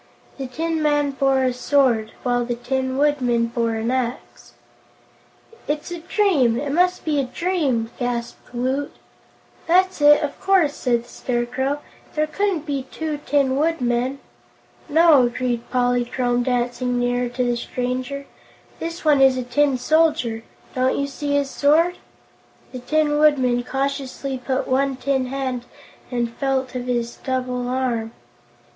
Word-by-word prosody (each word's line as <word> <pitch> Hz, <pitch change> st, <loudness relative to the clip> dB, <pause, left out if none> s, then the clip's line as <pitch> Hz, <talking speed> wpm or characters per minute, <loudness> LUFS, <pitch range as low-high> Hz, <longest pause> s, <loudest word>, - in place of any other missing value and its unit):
This 255 Hz, -2 st, -6 dB
tin 325 Hz, 0 st, -1 dB
man 290 Hz, -1 st, +2 dB
bore 270 Hz, -1 st, +2 dB
a 255 Hz, -1 st, +1 dB
sword, 250 Hz, -4 st, +2 dB
while 245 Hz, -1 st, +1 dB
the 240 Hz, 0 st, -2 dB
Tin 260 Hz, +2 st, -2 dB
Woodman 255 Hz, -5 st, +2 dB
bore 230 Hz, -1 st, -1 dB
an 225 Hz, +2 st, -1 dB
axe. 255 Hz, -1 st, -4 dB, 1.1 s
"It's 295 Hz, +3 st, -3 dB
a 345 Hz, -, -4 dB
dream; 325 Hz, -, +2 dB
it 285 Hz, -1 st, -3 dB
must 360 Hz, +4 st, +2 dB
be 300 Hz, -2 st, +1 dB
a 275 Hz, -, 0 dB
dream!" 270 Hz, -7 st, -1 dB
gasped 240 Hz, -1 st, -4 dB
Woot. 260 Hz, +4 st, -1 dB, 0.8 s
"That's 370 Hz, 0 st, +3 dB
it, 295 Hz, +1 st, +6 dB
of 285 Hz, -1 st, -4 dB
course," 375 Hz, -7 st, +3 dB
said 240 Hz, -4 st, 0 dB
the -, -, -19 dB
Scarecrow; 255 Hz, +4 st, -2 dB, 0.3 s
"there 305 Hz, 0 st, +2 dB
couldn't 365 Hz, -1 st, -1 dB
be 275 Hz, -3 st, -3 dB
two 310 Hz, -2 st, -4 dB
Tin 275 Hz, -2 st, +2 dB
Woodmen." 265 Hz, -4 st, 0 dB, 0.7 s
"No," 310 Hz, -5 st, +6 dB
agreed 245 Hz, -1 st, -3 dB
Polychrome, 245 Hz, 0 st, +1 dB
dancing 245 Hz, 0 st, -1 dB
nearer 245 Hz, 0 st, 0 dB
to 250 Hz, +1 st, -2 dB
the 245 Hz, -1 st, +1 dB
stranger, 255 Hz, +3 st, -3 dB, 0.5 s
"this 335 Hz, 0 st, -5 dB
one 295 Hz, -3 st, +5 dB
is 265 Hz, -1 st, +5 dB
a 255 Hz, -, -2 dB
Tin 275 Hz, +2 st, +2 dB
Soldier. 255 Hz, -6 st, +2 dB, 0.3 s
Don't 255 Hz, 0 st, +1 dB
you 280 Hz, -, 0 dB
see 285 Hz, +1 st, -3 dB
his 280 Hz, -1 st, 0 dB
sword?" 325 Hz, +5 st, +3 dB, 0.7 s
The 255 Hz, -, -6 dB
Tin 295 Hz, +3 st, +1 dB
Woodman 260 Hz, -5 st, +3 dB
cautiously 270 Hz, 0 st, -3 dB
put 260 Hz, +1 st, -1 dB
out -, -, -10 dB
one 270 Hz, +1 st, +1 dB
tin 265 Hz, 0 st, -1 dB
hand 260 Hz, -2 st, -3 dB, 0.4 s
and 235 Hz, -2 st, -2 dB
felt 270 Hz, -2 st, -1 dB
of 250 Hz, -1 st, -4 dB
his 240 Hz, -1 st, -2 dB
double's 250 Hz, -2 st, -2 dB
arm. 245 Hz, -3 st, -1 dB
260 Hz, 145 wpm, -22 LUFS, 245-290 Hz, 1.1 s, it